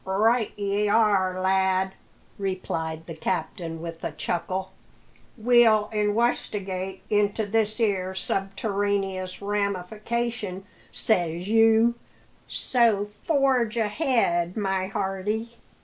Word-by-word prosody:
"Right 220 +4 +2
ye 205 +1 0
are, 200 -4 +3
lad," 190 0 +2 0.5
replied 165 -4 -3
the 165 - -7
captain 165 0 -3
with 165 -1 -7
a - - -2
chuckle. 185 +2 -3 0.7
"We'll 225 -2 +4
inwestigate 205 -3 -1
into 210 +1 +2
this 215 +1 0
'ere 190 -4 0
subterraneous 195 -1 -2
ramification, 205 +1 -2 0.3
says 175 -3 0
you; 225 +1 +5 0.5
so 225 -5 +2
forge 265 -7 +2
ahead, 210 - +1
my 190 -2 0
hearty." 200 +3 -2
200 Hz, 90 wpm, -26 LUFS, 185-220 Hz, 0.7 s, you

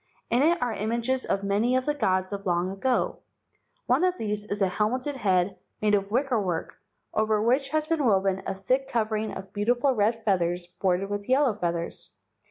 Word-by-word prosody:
In 240 - +3
it 335 +4 +3
are 240 -2 -1
images 235 +5 -1
of 195 - -1
many 210 +5 +1
of 255 0 +1
the 295 - +1
gods 185 -8 0
of 200 0 -5
long 175 +1 +1
ago. 245 +6 0 0.7
One 260 +7 +2
of 365 0 +2
these 210 -1 -3
is 205 0 -3
a 195 - +3
helmeted 250 +9 -1
head 190 -4 +1 0.2
made 210 -1 +2
of 200 -1 +1
wicker 250 0 +1
work, 175 -4 -3 0.3
over 215 0 +2
which 255 +5 +2
has 310 +1 0
been 320 -2 0
woven 195 -3 +2
a - - -2
thick 255 +8 0
covering 220 -2 -1
of 190 0 -8
beau¬ 205 +1 -2
tiful 245 +3 +3
red 225 +2 +1
feathers 175 -3 +1
bordered 185 +2 -1
with 205 +1 -4
yellow 265 -2 +4
feathers. 170 -4 -3
215 Hz, 190 wpm, -26 LUFS, 195-255 Hz, 0.7 s, yellow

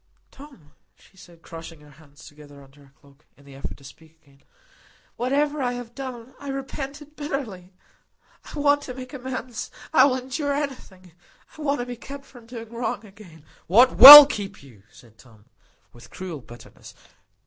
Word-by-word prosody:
"Tom," 270 - -17 0.2
she - - -26
said, 170 -3 -19
crushing 165 -1 -12
her 150 0 -19
hands 145 +1 -20
together 145 -2 -16
under 140 +1 -21
her 135 - -26
cloak, 140 +1 -25
in 140 - -23
the 140 - -16
effort 135 - -9
to 140 - -21
speak 160 +4 -18
again, 140 -1 -27 0.7
"whatever 285 +4 -2
I 245 -1 -2
have 245 -1 -10
done, 255 -2 -10
I 285 - -12
repent 275 +1 -7
it 300 +1 -23
bitterly. 250 -12 -7 0.7
I - - -12
want 290 0 +1
to 250 -3 -10
make 255 0 -11
amends. 255 -3 -7 0.2
I - - +5
will 270 -2 0
endure 265 +3 -5
anything. 255 - -8 0.4
I 310 - -13
want 285 -3 -2
to - - -6
be 245 -1 -9
kept 275 +3 -12
from 245 -4 -18
doing 230 -1 -11
wrong 230 -2 -5
again." 190 -7 -18 0.2
"What 240 +8 +3
will 290 +4 +13
keep 200 - -8
you?" 120 -8 -19
said 115 0 -21
Tom, 110 -4 -22 0.5
with 120 - -17
cruel 180 -5 -9
bitterness. 120 0 -16
230 Hz, 175 wpm, -22 LUFS, -, 0.7 s, will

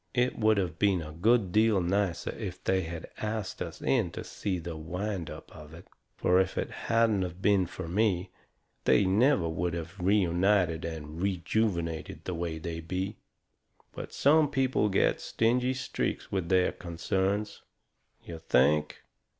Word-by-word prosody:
It 125 0 +1
would 110 -1 +4
of 85 -4 -2
been 95 -5 +2
a 75 - -8
good 100 +4 +2
deal 110 0 +4
nicer 95 0 0
if 95 -5 -7
they 95 0 +2
had 80 -1 -7
ast 110 -2 -3
us 85 -2 -6
in 115 -9 +2
to - - -5
see 95 -3 -3
the 85 -1 -6
wind 90 +3 -4
up - - -10
of 75 0 -11
it. 85 - -13 0.3
Fur, 90 +1 +3
if 95 - 0
it - - -2
hadn't 115 -3 +1
of 90 0 -6
been 100 -2 +3
fur 85 - -7
me, 95 -1 +1 0.5
they 100 - +4
never 105 - +3
would 85 +1 -2
of 85 +3 -6
been 90 -1 -3
reunited 90 -3 +2
and 80 0 -6
rejuvenated 90 -3 -1
the 90 - -3
way 85 -1 -3
they 80 0 -5
be. 95 +5 -4 0.7
But - - -8
some 150 +1 +4
people 130 -6 +1
get 95 - +2
stingy 125 +3 +1
streaks 130 - -3
with 95 -4 -2
their 95 -1 +3
concerns. 95 +4 -2 0.6
You 85 -1 -8
think!" 75 0 +2
95 Hz, 160 wpm, -29 LUFS, 85-105 Hz, 0.7 s, would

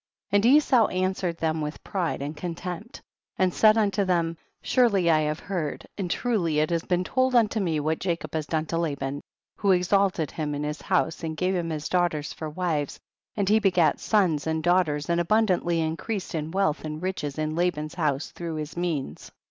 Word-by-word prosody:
9. 205 - +5
And 205 - +2
Esau 260 -4 +5
answered 185 -2 -1
thcni 160 -1 -1
with 150 +1 -5
pride 175 -7 -2
and 150 +2 -5
contem})t, 175 - -6 0.4
and 185 -2 +2
said 215 0 +5
unto 205 -2 +2
them, 170 -3 +1 0.3
surely 200 -9 +3
I 155 - +4
have 150 0 -1
heard 170 -8 -4
and 190 -3 -3
truly 180 -9 0
it 155 +2 +2
lias 170 -1 +1
been 180 +1 0
told 260 +5 +1
unto 225 -2 +3
me 165 -6 0
what 155 +2 -1
Jacob 165 -4 -3
has 155 -2 -2
done 160 -1 -1
to 165 +1 -2
Laban, 140 -3 -2 0.4
who 200 -2 +3
exalted 180 -3 +2
him 150 -2 -3
in 145 - -3
his 150 +1 -4
house 170 -3 0
and 160 -1 -4
gave 185 +2 +1
him 170 -2 -1
his 155 -2 -3
daugh 175 -1 +2
ters 150 -2 -5
for 155 - -6
wives, 155 -3 -2 0.4
and 200 -2 0
he 215 +2 +5
begat 180 -7 +3
sons 180 -9 +1
and 160 0 -1
daughters, 175 -5 +2
and 170 0 +2
abundantly 180 -3 +2
increased 175 +6 -3
in 155 -1 -2
wealth 190 -3 0
and 155 +1 -5
riches 155 -7 -3
in 155 0 -1
Laban's 160 -3 -1
house 150 -4 -1
through 170 -2 -5
his 155 0 -5
means. 160 - -3
170 Hz, 195 wpm, -26 LUFS, 155-190 Hz, 0.4 s, 9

